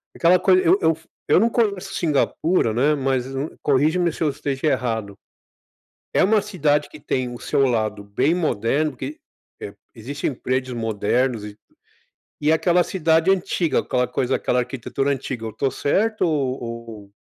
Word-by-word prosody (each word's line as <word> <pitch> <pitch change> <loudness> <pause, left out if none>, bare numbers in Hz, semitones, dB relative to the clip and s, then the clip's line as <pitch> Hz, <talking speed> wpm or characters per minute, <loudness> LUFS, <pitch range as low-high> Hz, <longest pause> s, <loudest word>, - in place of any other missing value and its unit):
aquela 175 +2 +4
coisa, 185 0 +4
eu 180 +4 +4
eu 160 -1 +2 0.3
eu - - +5
não 230 +2 +3
conheço 200 -5 -1
Cingapura, 155 -3 +1
né, 140 +6 +3
mas 130 -2 0 0.4
corrige-me 155 +5 +2
se - - -11
eu 155 - +3
esteja 140 +1 -3
errado. 110 -7 -1 1.0
É - - +4
uma 210 +2 +4
cidade 150 -8 0
que 155 - -12
tem 125 -3 -2
o 120 - -9
seu 135 - +1
lado 110 -3 -1
bem 125 +10 +1
moderno, 150 - 0
porque, 135 +2 -7 0.4
eh, - - -7 0.2
existem 135 +5 -4
prédios 130 0 -2
modernos 115 +1 0
e 105 0 -10 0.8
e 150 +2 +3
aquela 175 +2 +3
cidade 165 0 +2
antiga, 180 -3 +1
aquela 125 0 0
coisa, 125 - -1
aquela 125 - 0
arquitetura 135 +2 -2
antiga, 130 -4 -3
eu - - -4
estou 135 +4 -1
certo 215 - 0
ou 140 -5 -1
ou? 115 -4 -8
140 Hz, 155 wpm, -22 LUFS, 120-165 Hz, 1.0 s, eu